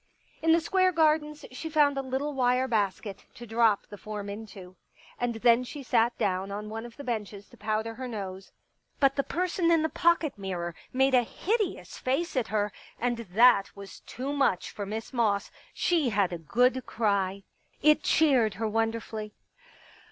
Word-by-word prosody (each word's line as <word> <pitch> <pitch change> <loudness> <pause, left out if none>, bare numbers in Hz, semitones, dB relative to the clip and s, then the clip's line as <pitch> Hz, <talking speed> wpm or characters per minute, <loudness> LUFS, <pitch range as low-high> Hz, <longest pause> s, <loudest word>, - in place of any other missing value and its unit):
In 325 - +3
the 330 - +6
Square 370 +2 +2
Gardens 305 -2 +1
she 290 +6 -6
found 295 -2 +3
a 275 - -1
little 270 +3 -3
wire 255 0 +2
basket 205 -3 -2
to 240 - -9
drop 225 -2 +2
the 205 - -11
form 210 -1 -6
into. 200 -3 -10 0.4
And 245 -1 -1
then 235 +2 +4
she 275 +3 -8
sat 235 -1 +2
down 190 0 -1
on 210 +1 -5
one 225 +2 -5
of 235 - -16
the 285 - -8
benches 210 -5 -4
to - - -17
powder 220 +1 -2
her 255 +2 -6
nose. 195 -4 -6 0.5
But 275 -1 +4
the 275 - +2
person 350 +2 0
in 330 -2 +4
the 320 - +1
pocket 335 - +1
mirror 175 -3 -4 0.2
made 265 +1 +2
a 250 - +6
hideous 400 - -2
face 290 +7 -1
at 250 -4 0
her, 210 -1 -1 0.3
and 240 0 0
that 225 0 +4
was 200 -1 -10
too 270 +4 -5
much 275 -10 +1
for 205 -2 -6
Miss 220 +5 -5
Moss; 215 -5 +1 0.2
she 325 -7 +1
had 200 -4 +1
a 170 - -4
good 250 - +2
cry. 200 -3 0 0.4
It 305 0 +5
cheered 255 -10 +3
her 225 - -2
wonder 225 +1 0
fully. 215 -2 -7
235 Hz, 180 wpm, -28 LUFS, 205-275 Hz, 0.5 s, the